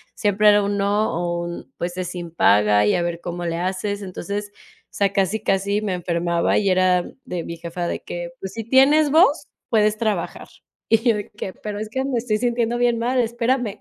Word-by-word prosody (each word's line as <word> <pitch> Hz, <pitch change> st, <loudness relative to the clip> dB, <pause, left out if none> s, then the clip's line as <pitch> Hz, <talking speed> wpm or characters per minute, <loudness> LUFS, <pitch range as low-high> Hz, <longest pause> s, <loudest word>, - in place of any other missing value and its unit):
siempre 210 Hz, -1 st, +3 dB
era 205 Hz, 0 st, +5 dB
un 200 Hz, 0 st, -1 dB
no 205 Hz, +2 st, +1 dB
o 175 Hz, 0 st, -2 dB
un, 170 Hz, 0 st, -8 dB
pues, 175 Hz, +1 st, -4 dB
es 185 Hz, -, -3 dB
sin 175 Hz, -2 st, -7 dB
paga 105 Hz, -, +4 dB
y -, -, +3 dB
a 175 Hz, -, 0 dB
ver 170 Hz, 0 st, -3 dB
cómo 175 Hz, 0 st, -5 dB
le 165 Hz, 0 st, -2 dB
haces. 190 Hz, +3 st, -2 dB
Entonces, 200 Hz, +2 st, -5 dB
o -, -, -23 dB
sea, 200 Hz, -1 st, +1 dB
casi, 195 Hz, +2 st, 0 dB
casi 200 Hz, +1 st, +1 dB
me 200 Hz, -, -1 dB
enfermaba 170 Hz, -1 st, 0 dB
y 200 Hz, -, +2 dB
era 185 Hz, -1 st, +3 dB, 0.2 s
de 180 Hz, -8 st, -4 dB
mi 170 Hz, -, -7 dB
jefa 170 Hz, +1 st, -4 dB
de -, -, -3 dB
que: 175 Hz, 0 st, -6 dB
"Pues 190 Hz, -, -6 dB
si 225 Hz, -, -5 dB
tienes 275 Hz, +5 st, +4 dB
voz, 310 Hz, -3 st, +4 dB, 0.2 s
puedes 215 Hz, -1 st, +2 dB
trabajar", 210 Hz, -6 st, -2 dB, 0.4 s
y 225 Hz, -, +6 dB
yo 225 Hz, -, +4 dB
de 205 Hz, -1 st, -6 dB
que: 190 Hz, -, -6 dB
"Pero 205 Hz, +1 st, -6 dB
es 215 Hz, 0 st, -5 dB
que 265 Hz, +4 st, -2 dB
me 270 Hz, -3 st, -1 dB
estoy 225 Hz, -2 st, -1 dB
sintiendo 240 Hz, 0 st, 0 dB
bien 240 Hz, -1 st, +2 dB
mal, 250 Hz, +2 st, 0 dB
espérame". 235 Hz, -2 st, 0 dB
200 Hz, 215 wpm, -22 LUFS, 175-225 Hz, 0.4 s, y